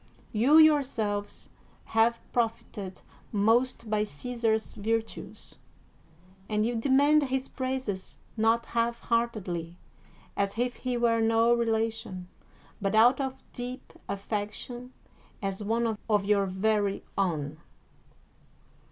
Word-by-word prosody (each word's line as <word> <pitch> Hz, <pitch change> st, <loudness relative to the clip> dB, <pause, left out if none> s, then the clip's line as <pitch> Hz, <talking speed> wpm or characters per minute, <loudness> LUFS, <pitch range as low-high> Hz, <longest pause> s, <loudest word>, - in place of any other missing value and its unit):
You 250 Hz, +8 st, +5 dB
yourselves 255 Hz, -10 st, +3 dB, 0.5 s
have 230 Hz, +1 st, +4 dB
profited 220 Hz, -5 st, -2 dB, 0.3 s
most 230 Hz, +3 st, +2 dB
by 210 Hz, 0 st, +1 dB
Caesar's 220 Hz, +5 st, -1 dB
virtues; 225 Hz, +2 st, -4 dB, 0.9 s
and 215 Hz, 0 st, +1 dB
you 240 Hz, -, 0 dB
demand 280 Hz, +6 st, +4 dB
his 265 Hz, 0 st, -2 dB
praises 255 Hz, -7 st, -4 dB, 0.2 s
not 225 Hz, +1 st, +2 dB
half 235 Hz, 0 st, 0 dB
heartedly, 190 Hz, -8 st, -1 dB, 0.6 s
as 200 Hz, +1 st, -1 dB
if 245 Hz, +1 st, -1 dB
he 250 Hz, -1 st, -2 dB
were 230 Hz, -1 st, +2 dB
no 225 Hz, +1 st, +4 dB
relation, 225 Hz, -5 st, -1 dB, 0.5 s
but 195 Hz, +1 st, 0 dB
out 240 Hz, +5 st, +6 dB
of 265 Hz, -1 st, -4 dB
deep 250 Hz, +1 st, -6 dB, 0.2 s
aflfec 205 Hz, +1 st, -2 dB
tion 245 Hz, +2 st, -8 dB, 0.5 s
as 195 Hz, 0 st, -3 dB
one 225 Hz, +1 st, 0 dB
of 210 Hz, -2 st, +3 dB
your 200 Hz, -1 st, +3 dB
very 200 Hz, +1 st, 0 dB
own. 155 Hz, -6 st, -1 dB
225 Hz, 110 wpm, -28 LUFS, 205-240 Hz, 0.9 s, out